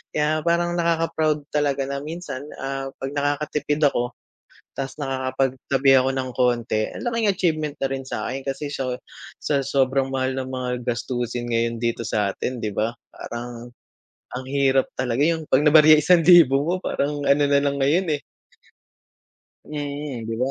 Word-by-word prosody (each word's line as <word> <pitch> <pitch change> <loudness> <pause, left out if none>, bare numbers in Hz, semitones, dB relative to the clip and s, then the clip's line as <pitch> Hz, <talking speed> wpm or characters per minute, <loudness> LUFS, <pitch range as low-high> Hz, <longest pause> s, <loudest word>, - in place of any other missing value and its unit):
Kaya 150 +1 +1
parang 175 0 +1
nakaka-proud 160 -3 +1
talaga 145 -2 +1
na 140 +1 -3
minsan, 150 -2 -6
ah, 135 0 -3
'pag 135 0 -5
nakakatipid 145 +1 -1
ako 120 +1 -2 0.6
tapos 135 -1 -5
nakakapag 130 -1 -1 0.2
tabi 135 0 +3
ako 130 0 +3
ng 130 -1 -2
konti 120 -3 +1
ang - - -7
laking 230 -3 0
achievement 155 -5 -1
na 135 - +1
rin 135 0 -4
sakin 130 0 -4
kasi 145 +2 -4
sa 130 -3 -2 0.4
sa 145 -2 0
sobrang 135 0 +1
mahal 130 0 -1
ng 130 -1 -3
mga 130 -1 -3 0.2
gastusin 120 0 -2
ngayon 115 0 0
dito 115 -1 -1
sa 105 -2 0
atin 125 +1 -4
di 105 - -2
ba, 110 +4 -1 0.2
parang, 120 0 -7 0.6
ang 130 +1 -6
hirap 135 -1 +2
talaga 125 +1 0
yung 165 -1 0
'pag 135 +3 +4
nabarya 155 0 +8
isang 170 +3 +4
libo 160 -6 +7
mo 170 +4 0
parang 145 -5 -2
ano 140 +1 +4
nalang 140 0 +2
ngayon, 165 +8 +2
eh. 145 - -4 1.5
Mm, 145 -4 -5
di 115 - -3
ba? 130 +3 0
135 Hz, 160 wpm, -23 LUFS, 130-150 Hz, 1.5 s, nabarya